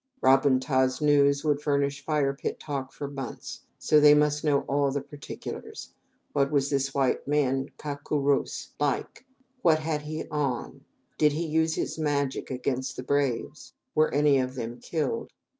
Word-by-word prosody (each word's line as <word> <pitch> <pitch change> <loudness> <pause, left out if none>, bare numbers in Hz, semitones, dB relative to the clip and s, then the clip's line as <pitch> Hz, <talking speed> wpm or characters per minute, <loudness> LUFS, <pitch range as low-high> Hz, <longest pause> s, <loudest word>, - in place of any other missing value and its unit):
Ra 130 - +6
bun 135 -1 +2
ta's 130 -1 +1
news 145 -1 +3
would 150 -2 +1
furnish 140 -1 0
fire 145 -3 +1
pit 140 - -4
talk 135 -3 -4
for 145 - -6
months, 135 -3 -7 0.2
so 155 - +4
they 150 0 +8
must 150 0 +2
know 145 -3 +3
all 140 0 +1
the 140 +1 -1
particulars. 145 0 -8 0.4
What 140 -1 +2
was 140 -1 +1
this 135 -1 0
white 135 -2 +1 0.5
cau 145 -1 -4
co 150 - -1
rouse, 140 0 0
(captain 145 - +3
or - - +4
leader) 135 - +1
like? - - -12 0.4
What 165 -7 +5
had 155 -1 -2
he 155 +1 -5
on? 140 -5 -3 0.3
Did 150 -1 +4
he 165 +3 -2
use 160 +1 +1
his - - -3
magic 140 -3 -1
against 130 0 -2
the 125 - -6
braves? 140 +1 -1 0.2
Were 155 0 +3
any 145 -1 +4
of 130 0 -2
them 120 -1 -5
killed? 175 - -2
145 Hz, 175 wpm, -27 LUFS, 135-150 Hz, 0.5 s, they